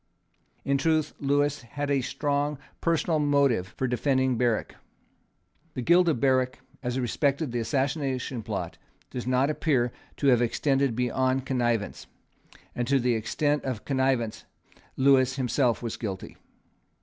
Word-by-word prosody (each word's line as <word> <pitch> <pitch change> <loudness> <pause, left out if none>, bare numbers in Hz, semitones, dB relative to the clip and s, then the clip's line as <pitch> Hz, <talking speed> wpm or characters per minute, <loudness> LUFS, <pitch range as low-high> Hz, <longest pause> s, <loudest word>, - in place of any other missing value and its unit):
In 140 0 +1
truth 155 0 +1
Lewis 145 0 +1
had 145 +4 -4
a 140 -1 +2
strong 145 +2 -1 0.2
personal 165 -1 +1
motive 140 -9 +2
for 130 - 0
defending 130 +1 +1
Berwick. 120 -2 0 1.0
The 130 - -3
guilt 175 +5 +5
of 155 -8 +2
Berwick 130 -1 +2 0.2
as 125 0 -2
respected 140 +3 0
the 120 - -1
Assassination 135 -1 -1
Plot - - -5 0.3
does 125 -1 -5
not 130 +3 +2
appear 130 -6 +1 0.3
to 140 - 0
have 120 -2 +4
extended 135 +1 +1
beyond 130 +2 0
connivance; 120 -5 -1 0.7
and 120 -1 -2
to 140 0 +3
the 125 -1 +1
extent 145 +6 0
of 125 -5 -4
connivance 130 -5 0 0.5
Lewis 130 -1 +4
himself 125 -2 +1
was 115 - -4
guilty. 95 -4 -5
130 Hz, 135 wpm, -27 LUFS, 120-145 Hz, 1.0 s, guilt